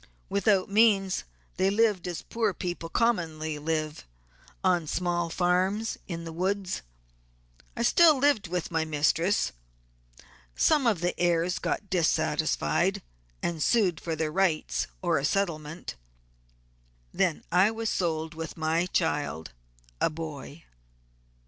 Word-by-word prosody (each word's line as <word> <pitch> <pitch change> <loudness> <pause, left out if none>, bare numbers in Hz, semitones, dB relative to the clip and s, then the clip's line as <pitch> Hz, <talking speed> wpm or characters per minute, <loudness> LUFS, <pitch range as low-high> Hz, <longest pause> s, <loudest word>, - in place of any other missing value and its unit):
Without 200 -1 +2
means 200 -2 +3 0.3
they 190 +2 +3
lived 205 -3 +2
as 175 -2 -5
poor 220 -5 -1
people 175 -1 -4
commonly 160 -9 0
live, 155 - -3 0.6
on 175 -4 +2
small 175 0 -1
farms 185 +6 +1
in 170 -2 -5
the 165 -1 -7
woods. 190 - -1 1.0
I 235 - 0
still 315 +4 +6
lived 270 -7 +2
with 175 0 -3
my 160 -1 +1
mistress. 160 +5 +1 1.0
Some 295 -5 +3
of 205 -7 +1
the 175 0 0
heirs 175 0 +1
got 200 - -3
dissatisfied, 175 -4 +1 0.4
and 165 -2 -2
sued 190 -4 +2
for 165 -1 -3
their 155 -1 -2
rights 180 -3 0 0.2
or - - +2
a - - -5
settlement; 160 -2 -2 1.2
then 75 - 0
I 185 +4 +5
was 225 0 -3
sold 160 -4 -1
with 165 +1 -7
my 160 +2 +1
child, 150 - -1 0.5
a - - +3
boy." 155 -1 -8
175 Hz, 125 wpm, -28 LUFS, 160-200 Hz, 1.2 s, still